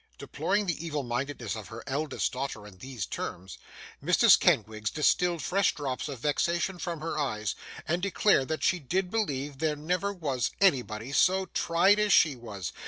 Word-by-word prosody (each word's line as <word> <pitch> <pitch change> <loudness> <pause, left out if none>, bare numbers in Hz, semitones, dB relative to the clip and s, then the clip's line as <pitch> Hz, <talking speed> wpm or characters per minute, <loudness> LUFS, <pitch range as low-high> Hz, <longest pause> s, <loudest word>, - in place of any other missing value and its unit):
Deploring 205 +2 -1
the 165 -3 -2
evil 150 -4 -3
mindedness 125 -2 -3
of 110 -4 -8
her 115 +3 -9
eldest 145 +2 -2
daughter 125 -5 -4
in 95 -3 -14
these 125 -5 -5
terms, 90 0 -6 0.4
Mrs - - +6
Kenwigs 110 0 +1
distilled 170 +1 +1
fresh 195 +1 +1
drops 140 -1 -3
of 140 - -5
vexation 170 +7 0
from 170 -3 -4
her 160 -1 -3
eyes, 110 -7 -1 0.3
and 170 +3 0
declared 195 -7 +2
that 160 - -3
she 180 - +2
did 180 +6 -2
believe 145 -10 -2
there 155 -1 0
never 180 +6 -1
was 140 - -2
anybody 125 - +1
so 190 +6 +3
tried 180 +4 +3
as 210 -1 +2
she 155 -6 +5
was. 105 -7 -7
150 Hz, 170 wpm, -28 LUFS, 125-180 Hz, 0.4 s, Mrs